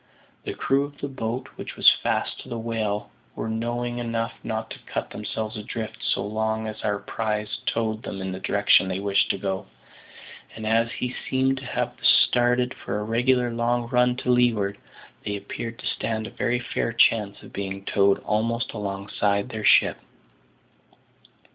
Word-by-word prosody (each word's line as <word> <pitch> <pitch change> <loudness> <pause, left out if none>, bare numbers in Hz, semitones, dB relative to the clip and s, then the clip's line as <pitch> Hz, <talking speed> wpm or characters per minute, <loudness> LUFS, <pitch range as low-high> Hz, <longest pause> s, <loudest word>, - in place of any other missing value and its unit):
The - - -3
crew 135 +1 +2
of 145 0 -8
the 140 - -2
boat 125 -1 -3
which - - -6
was - - +2
fast - - 0
to - - -10
the 120 - -3
whale 110 -2 -2 0.2
were - - -3
knowing 120 +2 -2
enough 115 -1 -1
not 110 0 -3
to - - -7
cut - - -4
themselves 110 +1 -4
adrift 110 0 -5
so 95 - 0
long 110 +1 -1
as 110 -1 -5
their 105 -1 0
prize 105 0 -2
towed 110 -1 0
them 100 - -5
in 95 0 -3
the 95 - -5
direction 100 -1 +4
they 95 0 -2
wished 100 0 +2
to - - +1
go; 95 -1 -3 0.9
and, 110 - -6
as 115 +1 +3
he 125 -1 -3
seemed 130 0 +2
to 130 - -7
have - - -1
started 125 +1 +4
for 100 - -4
a - - -2
regular 120 +2 +2
long 120 0 0
run 125 0 +3
to 125 0 0
leeward, 110 -5 +2 0.4
they 105 - -2
appeared 115 +3 -5
to - - -10
stand 110 -1 -2
a - - -7
very 120 0 0
fair 120 - -1
chance 105 -3 +3
of - - -13
being 95 0 -4
towed 100 -1 +4
almost 115 +2 0
alongside 100 +1 -1
their 110 -3 -5
ship. - - +5
110 Hz, 175 wpm, -25 LUFS, 105-120 Hz, 0.9 s, ship